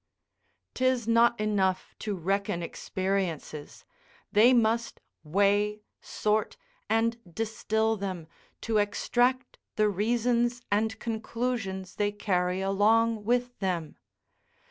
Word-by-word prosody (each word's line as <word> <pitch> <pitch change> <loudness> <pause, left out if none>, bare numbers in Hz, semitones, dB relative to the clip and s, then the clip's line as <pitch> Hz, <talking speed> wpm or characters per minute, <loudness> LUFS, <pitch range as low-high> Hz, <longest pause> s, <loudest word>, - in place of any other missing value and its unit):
'Tis 255 -3 +1
not 235 0 +4
enough 195 -3 0
to 210 -2 -3
reckon 190 0 -1
experiences, 180 -5 -3 0.5
they 220 +5 +6
must 230 -1 +1 0.2
weigh, 205 +5 +1 0.2
sort 215 0 -1 0.3
and 230 +1 +2
distil 220 +2 0
them, 190 -5 -5 0.3
to 225 -2 +1
extract 245 +5 0 0.2
the 215 -1 +3
reasons 235 +4 +1
and 220 +2 +1
conclusions 220 -4 -3
they 205 0 +1
carry 185 -3 0
along 215 +3 +2
with 245 +2 0
them. 175 -5 -2
215 Hz, 100 wpm, -28 LUFS, 195-230 Hz, 0.5 s, they